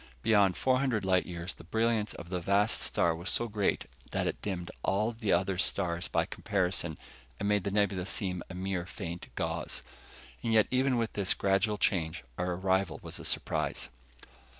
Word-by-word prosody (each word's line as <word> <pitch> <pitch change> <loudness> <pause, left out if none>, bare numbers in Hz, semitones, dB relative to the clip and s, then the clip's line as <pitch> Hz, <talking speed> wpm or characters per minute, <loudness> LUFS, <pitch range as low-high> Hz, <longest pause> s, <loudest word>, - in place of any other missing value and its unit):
Beyond 100 -4 +4
four 130 -1 +3
hundred 125 -7 +1
light 95 -1 +3
years, 85 0 -4
the - - -14
brilliance 110 +3 +1
of 85 - -9
the 90 0 -1
vast 100 +4 +2
star 85 -1 +2
was 85 +4 -4
so 120 - 0
great 105 -2 0 0.2
that - - 0
it - - -2
dimmed 90 -4 -3
all 105 +4 +1
the 110 -2 -2
other 95 +1 +2
stars 85 -2 0
by - - +1
comparison, 90 -5 0 0.4
and 100 - -1
made 105 -2 +2
the - - +1
nebula 100 -2 +1
seem 95 -5 -1
a 90 - -7
mere 95 -1 -2
faint 85 -3 -6
gauze. - - -2 0.6
And 115 - -1
yet 110 -2 +6
even 130 0 +3
with 115 -1 -1
this 100 -2 +1
gradual 100 +2 +2
change, 80 -6 +1 0.2
our 90 0 0
arrival 95 -2 +1
was - - -5
a - - -8
surprise. - - -1
95 Hz, 180 wpm, -31 LUFS, 90-105 Hz, 0.6 s, yet